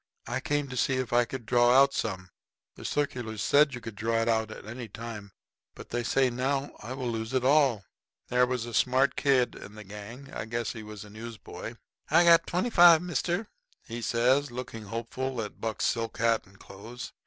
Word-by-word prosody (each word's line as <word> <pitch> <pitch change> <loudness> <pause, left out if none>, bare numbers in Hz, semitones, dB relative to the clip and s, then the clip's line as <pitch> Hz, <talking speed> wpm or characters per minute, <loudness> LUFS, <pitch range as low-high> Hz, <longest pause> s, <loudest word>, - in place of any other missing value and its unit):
I - - -2
came 145 +1 -1
to 125 - -6
see 130 +2 +1
if 130 -2 -2
I 120 0 +4
could 125 -1 -7
draw 120 +1 +5
out 140 0 +5
some. 95 -4 -3 0.4
The - - -12
circulars 120 -7 -2
said 145 -2 +4
you 125 - -8
could 115 0 -7
draw 115 +3 -1
it - - -3
at 110 -2 -1
any 120 +2 -7
time. 110 -2 -8 0.4
But - - -11
they 120 - 0
say 130 +2 +2
now 135 +3 -1
I 115 +4 -6
will 130 -1 -4
lose 110 +2 -3
it 130 -1 +1
all." 135 -8 +3 0.4
There 125 0 +3
was 125 -2 -2
a 120 - -8
smart 130 +3 +3
kind 135 -2 +3
of 120 - -1
kid - - -11
in 105 - -11
the 110 - -9
gang 105 +7 -10
I - - -4
guess 115 +1 -3
he 115 - -8
was 105 -1 -9
a 105 - -14
newsboy. 115 +1 -8 0.3
"I 165 +3 +6
got 170 -1 +8
in - - -28
twenty 180 +8 0
fi', 175 -4 +8
mister," 175 - -2 0.4
he 120 -1 -6
says, 125 +5 +2
looking 120 -3 -7
hopeful 115 +4 -4
at 105 -2 -6
Buck's 110 -3 -2
silk 115 -1 -1
hat 115 -2 +1
and 95 0 -20
clothes. 110 +6 -10
120 Hz, 210 wpm, -28 LUFS, 110-135 Hz, 0.4 s, got